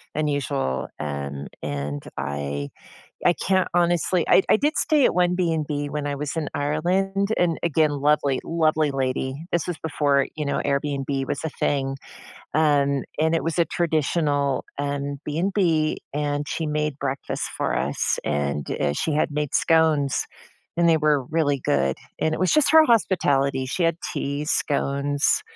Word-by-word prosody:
unusual. 140 - -1
And 70 -1 -5
and 70 0 -4
I 70 0 -3 0.6
I 175 - +6
can't 190 -1 +1
honestly 175 0 +2
I 190 - +6
I - - +7
did 295 +5 0
stay 300 -4 +4
at - - 0
one 180 0 +2
BnB 155 -5 -1
when 150 0 -3
I 145 -1 -2
was 145 +3 -4
in 155 -2 -1
Ireland. 190 +7 0
And, 170 -2 +1
again, 155 -2 +2
lovely, 145 -1 +1
lovely 155 -2 +1
lady. 135 +2 -2
This 175 - 0
was 175 -2 -4
before, 145 -3 +1
you 150 - -2
know, 140 - -1
Airbnb 140 -1 -1
was 140 - -3
a 160 - -1
thing. 135 -2 -1 0.6
Um, 140 -3 +2
and 160 +1 +2
it 165 - +1
was 165 +1 -2
a 170 - +5
traditional, 150 -4 0
um, 140 0 -2
BnB, 165 -1 +1 0.2
and 145 0 -1
she 160 - -2
made 150 -1 -1
breakfast 135 0 -3
for - - -1
us, - - -1
and, 70 -1 -1
eh, 70 - +1
she 155 - -1
had 150 - +1
made 150 -1 -3
scones, 160 -4 +3 0.5
and 170 0 +3
they 165 - +5
were 150 -4 +2
really 145 -1 0
good. 65 -1 +1 0.2
And 160 - +1
it - - -4
was 185 - +2
just 305 -2 +4
her 315 0 +8
hospitality. 140 - +2
She 175 - -2
had 165 -1 +2 0.2
teas, 145 +2 -2
scones, 145 - +1
150 Hz, 160 wpm, -24 LUFS, 140-165 Hz, 0.6 s, her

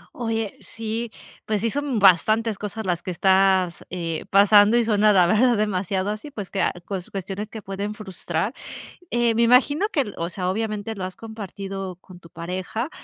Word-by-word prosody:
Oye, 225 -3 -2
sí, 225 +1 -4 0.4
pues 210 -2 -1
sí, 230 -1 0
son 285 -4 -1
bastantes 215 +3 +4
cosas 210 +1 -5
las 175 -1 -1
que - - -6
estás, 190 0 +2
eh, 170 -3 -4
pasando 205 +3 +6
y 235 - +3
suena 210 -1 +4
la 185 -3 +5
verdad 225 +5 +3
demasiado 195 -1 -1
así, 215 +8 -6
pues 205 -8 -7
que 195 - -1
a - - +2
cues 190 -3 -5
cuestiones 195 +2 -5
que 220 -2 -9
pueden 200 +2 -4
frustrar, 190 0 -3 0.6
eh, 240 -1 +2
me 235 - +2
imagino 285 - +4
que 290 - +1
el 205 - -7
o 170 +1 -2
sea, 180 0 -2
obviamente 215 +1 -3
lo 185 - -4
has 185 - -8
compartido 195 -4 -6
con 180 -1 -15
tu 170 - -15
pareja, 185 - -4
205 Hz, 185 wpm, -23 LUFS, 185-225 Hz, 0.6 s, pasando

